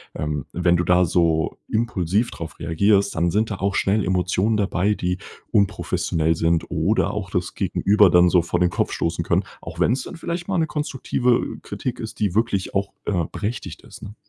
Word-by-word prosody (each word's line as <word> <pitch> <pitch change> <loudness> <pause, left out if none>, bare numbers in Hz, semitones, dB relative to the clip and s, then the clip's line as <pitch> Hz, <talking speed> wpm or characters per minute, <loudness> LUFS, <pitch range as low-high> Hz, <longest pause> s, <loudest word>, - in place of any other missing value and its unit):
ähm, 75 -1 -3
wenn 90 0 +2
du 85 - 0
da 90 0 +4
so 80 -2 +1
impulsiv 110 -1 0
drauf 85 -1 -8
reagierst, 100 +5 +2
dann 85 +1 +1
sind 110 +3 0
da - - -1
auch 100 0 -1
schnell 100 +1 +1
Emotionen 90 +4 +1
dabei, 100 0 +1
die 90 -2 -2 0.3
unprofessionell 80 -5 +1
sind 80 0 +1
oder 95 +3 +1
auch 100 -3 -4
das 90 -1 -2
Gegenüber 105 -1 +3
dann 90 +1 +5
so 90 0 +4
vor 85 - -2
den 90 - +4
Kopf - - -1
stoßen 85 +1 -2
können, - - +2 0.2
auch - - -8
wenn's 125 +2 +2
dann - - -8
vielleicht 170 +1 -4
mal 195 -2 0
'ne 160 - +2
konstruktive 130 -5 0 0.2
Kritik 125 -2 -5
ist, 110 -1 -7
die 100 -3 0
wirklich 110 -4 0
auch, 100 0 -1
äh, 90 -5 0
berechtigt 110 +4 -4
ist, - - -14
ne? 105 - -9
95 Hz, 190 wpm, -22 LUFS, 85-110 Hz, 0.3 s, dann